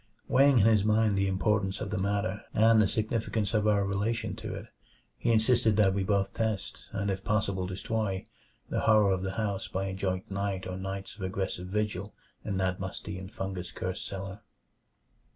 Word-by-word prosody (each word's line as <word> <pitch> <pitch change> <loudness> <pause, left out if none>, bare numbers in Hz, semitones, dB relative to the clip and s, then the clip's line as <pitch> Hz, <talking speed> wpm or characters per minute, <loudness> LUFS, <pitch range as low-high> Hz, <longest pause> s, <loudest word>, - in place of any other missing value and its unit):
Weighing 135 0 +5
in 105 - +5
his 110 -3 +5
mind 110 -1 +3
the 100 0 +2
importance 95 0 +1
of 100 - -4
the 105 - -1
matter, 100 +1 0
and 110 0 +6
the 105 - +4
significance 110 -1 -1
of 110 -1 +2
our 100 -2 +3
relation 110 +3 -1
to - - -5
it, - - -8 0.5
he 120 - 0
insisted 110 -1 +4
that 100 -3 +5
we 100 0 0
both 100 0 +1
test 110 -4 -2
and 100 0 -1
if 95 0 -4
possible 100 -3 0
destroy 95 +1 -2 0.4
the - - -1
horror 110 -3 +5
of 95 -1 +1
the 95 0 -3
house 100 -2 -2
by 95 +1 -2
a 95 - -3
joint 95 +2 -2
night 100 -1 -2
or 90 - -4
nights 95 +1 -5
of 105 - -13
aggressive 95 -1 -3
vigil 105 +2 -2 0.3
in 100 -3 -2
that 95 -1 0
musty 95 +1 -5
and 95 +1 -9
fungus 95 -3 -4
cursed 90 0 -4
cellar. 95 +1 -6
100 Hz, 190 wpm, -29 LUFS, 95-110 Hz, 0.5 s, and